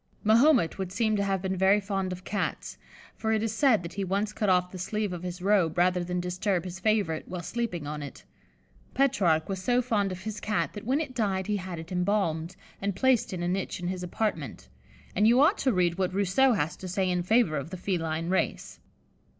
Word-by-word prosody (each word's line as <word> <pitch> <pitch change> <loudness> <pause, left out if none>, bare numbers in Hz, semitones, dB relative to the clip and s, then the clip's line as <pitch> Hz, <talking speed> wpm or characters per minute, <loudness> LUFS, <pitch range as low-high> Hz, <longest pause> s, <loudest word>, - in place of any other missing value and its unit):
Mahomet 230 - +4
would 190 -1 -3
seem 220 +1 +1
to 200 - +1
have 195 -1 -1
been 190 0 -1
very 190 +2 +4
fond 195 -2 -2
of 180 0 -6
Cats, 205 - -3 0.4
for 220 - -2
it 220 0 +1
is 225 -2 -1
said 225 -5 +3
that 170 - -7
he 200 - -3
once 200 +3 -1
cut 210 -2 0
off 180 -1 +2
the 185 - -8
sleeve 210 +1 -2
of 175 - -6
his 180 0 -6
robe 190 -5 +2
rather 180 0 +3
than 180 +1 -2
disturb 180 +1 -1
his 185 0 -7
favourite 200 -6 0
while 180 -1 -5
sleeping 220 -7 -3
on 150 +1 -5
it. 140 - -9 0.7
Petrarch 195 -13 +2
was 190 -2 -4
so 245 +5 +2
fond 215 -6 0
of 185 +1 -7
his 215 -1 -5
Cat 210 0 -1
that 205 - -8
when 270 +3 +2
it 295 -5 -4
died 195 -6 0
he 210 +1 0
had 185 -2 -6
it 160 +2 -9
embalmed, 180 -3 0 0.3
and 200 -1 -1
placed 260 -1 +2
in 180 -2 -4
a - - -1
niche 185 +1 -2
in 175 0 -3
his 185 -1 -4
apartment; 180 -4 -3 0.5
and 210 +3 +4
you 240 +3 +5
ought 295 - +4
to 265 - +2
read 180 -3 +1
what 185 0 0
Rousseau 200 +7 +3
has 165 -6 -1
to 185 - -7
say 185 +1 0
in 180 -1 +1
favour 215 -2 +2
of 140 +2 -5
the 185 - -6
feline 165 -3 -2
race. 190 - -1
190 Hz, 225 wpm, -28 LUFS, 180-215 Hz, 0.7 s, you